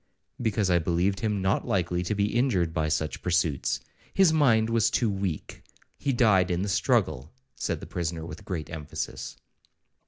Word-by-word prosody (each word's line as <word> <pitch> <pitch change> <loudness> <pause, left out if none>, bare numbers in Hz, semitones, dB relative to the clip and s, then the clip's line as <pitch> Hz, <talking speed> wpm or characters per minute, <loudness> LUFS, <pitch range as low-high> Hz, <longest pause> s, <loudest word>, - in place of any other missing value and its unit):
'—'Because 105 -4 +1
I 90 - +4
believed 90 +4 0
him 105 -3 -1
not 95 - +1
likely 90 -1 0
to 90 +4 -2
be 100 +2 0
injured 100 -10 +2
by 80 -2 0
such 80 0 -1
pursuits; 85 -6 +1 0.3
his 190 -4 +4
mind 120 -8 +4
was 115 -1 +3
too 115 -2 +1
weak,—he 95 - -5
died 100 -7 +4
in 90 +1 0
the 100 - -2
struggle,' 70 -5 +1 0.2
said - - -3
the - - -7
prisoner 85 -1 -3
with 80 +1 -9
great 85 -6 -5
emphasis. 80 -4 -5
95 Hz, 160 wpm, -27 LUFS, 85-110 Hz, 0.3 s, I